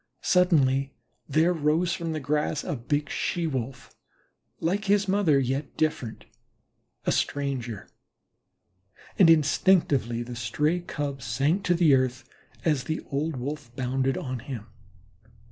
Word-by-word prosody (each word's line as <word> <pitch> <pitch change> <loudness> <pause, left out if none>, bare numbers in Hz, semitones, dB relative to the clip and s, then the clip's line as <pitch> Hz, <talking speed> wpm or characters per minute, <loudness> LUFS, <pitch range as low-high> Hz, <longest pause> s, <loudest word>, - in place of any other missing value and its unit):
Suddenly 140 -7 +3 0.3
there 160 +5 +3
arose 165 +2 +1
from 165 -1 -3
the 155 - -2
grass 150 +1 -1
a - - -3
big 145 +4 -1
She 175 -2 -2
wolf, 130 -4 -4 0.7
like 195 +6 -1
his 205 0 +3
mother, 190 -7 +3
yet 135 +2 -2
different, 140 -7 -2 0.8
a - - +2
stranger, 130 -6 -2 1.3
and 180 -4 +7
instinctively 145 - +3
the 120 0 -7
stray 150 +9 0
Cub 145 -5 -4
sank 140 - 0
to 175 - +3
the 165 -4 +5
earth, 130 -1 +1 0.4
as 150 -6 +1
the 160 +2 -2
old 150 +3 -1
Wolf 130 -1 -6
bounded 130 +1 0
on 130 -2 -4
him. 115 -2 -7
145 Hz, 130 wpm, -26 LUFS, 130-165 Hz, 1.3 s, and